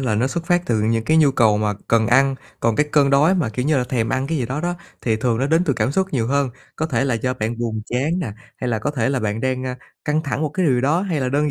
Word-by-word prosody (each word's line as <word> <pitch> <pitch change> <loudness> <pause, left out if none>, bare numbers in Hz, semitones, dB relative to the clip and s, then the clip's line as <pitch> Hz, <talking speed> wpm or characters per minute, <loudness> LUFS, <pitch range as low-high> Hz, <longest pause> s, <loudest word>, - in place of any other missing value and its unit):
là 120 -5 0
nó 120 +5 +1
xuất 165 +5 -4
phát 175 0 +2
từ 115 -3 +1
những 115 +1 0
cái 160 - +2
nhu 155 -3 +5
cầu 110 -5 +3
mà 105 -1 0
cần 115 -1 +3
ăn, 135 +2 +4 0.3
còn 115 -1 +1
cái 150 - +2
cơn 145 -2 +4
đói 150 +7 +4
mà, 160 -11 0
kiểu 125 +4 -3
như 155 -1 +3
là, 125 - +1
thèm 120 -3 -1
ăn 130 +3 -1
cái 160 0 -1
gì 125 - -1
đó 130 +5 -3
đó, 175 +2 -1 0.3
thì 110 -2 0
thường 115 0 0
nó 135 - +1
đến 160 +4 +3
từ 145 - +1
cảm 135 - 0
xúc 190 +2 +1
nhiều 115 -4 0
hơn. 140 0 +1 0.3
Có 160 - -1
thể 145 -3 0
là 130 - +1
do 125 +3 -1
bạn 115 0 -3
buồn 110 -2 -2
chán 145 +9 -1
nè, 115 - -3 0.2
hay 125 - -3
là 110 - 0
có 140 +7 -2
thể 125 -5 0
là 135 -2 0
bạn 110 +1 -2
đang, 130 0 -1
a, 125 0 -4 0.3
căng 150 +1 0
thẳng 145 0 -2
một 155 - +1
cái 180 +4 -1
điều 125 -4 +3
đó 150 +7 +2
hay 170 -8 -1
là 130 - 0
đơn 145 +2 +1
130 Hz, 315 wpm, -21 LUFS, 115-150 Hz, 0.3 s, nhu